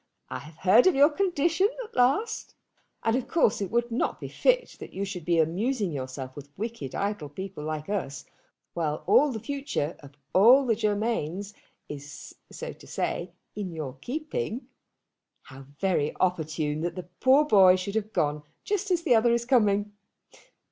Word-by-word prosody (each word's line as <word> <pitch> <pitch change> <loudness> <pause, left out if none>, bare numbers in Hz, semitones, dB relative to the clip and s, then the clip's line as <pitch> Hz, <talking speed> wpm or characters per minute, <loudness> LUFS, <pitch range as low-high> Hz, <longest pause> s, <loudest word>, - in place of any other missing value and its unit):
I - - -3
have 150 +2 -13
heard 195 - +5
of 370 - +4
your 285 +3 +6
condition 345 +2 +2
at 440 - -14
last, 280 - +1 0.5
and 225 0 +2
of 255 - -2
course 310 -11 +2
it 195 - -2
would 235 +1 0
not 230 - -1
be - - -6
fit - - +1
that - - -9
you 195 +1 -2
should 185 -5 -6
be 170 -1 +2
amusing 195 - +1
yourself 130 -1 -6
with 145 -1 -10
wicked 215 - -5
idle 200 -7 -2
people 190 +1 -7
like 155 0 -4
us, 145 -10 -3 0.5
while 155 -3 -2
all 290 0 +5
the 225 - -4
future 275 - -3
of 140 -1 -14 0.2
all 245 +8 +7
the 230 -3 +2
Germains 205 -3 -1 0.3
is, 145 -1 -9 0.2
so - - -6
to - - -16
say, 175 - -2 0.3
in 200 -3 -4
your 145 -5 -5
keeping. 305 - -4 0.7
How 135 0 -13
very 180 -7 0
opportune 155 -4 0
that 170 0 -2
that 180 -1 -10
poor 270 +3 +5
boy 190 -8 +7
should 185 +2 -4
have 215 0 -2
gone 150 -4 0 0.2
just 410 0 -1
as 350 -2 +1
the 310 - +4
other 235 +1 +4
is 235 0 +1
coming! 210 -5 +2
200 Hz, 170 wpm, -27 LUFS, 155-250 Hz, 0.7 s, all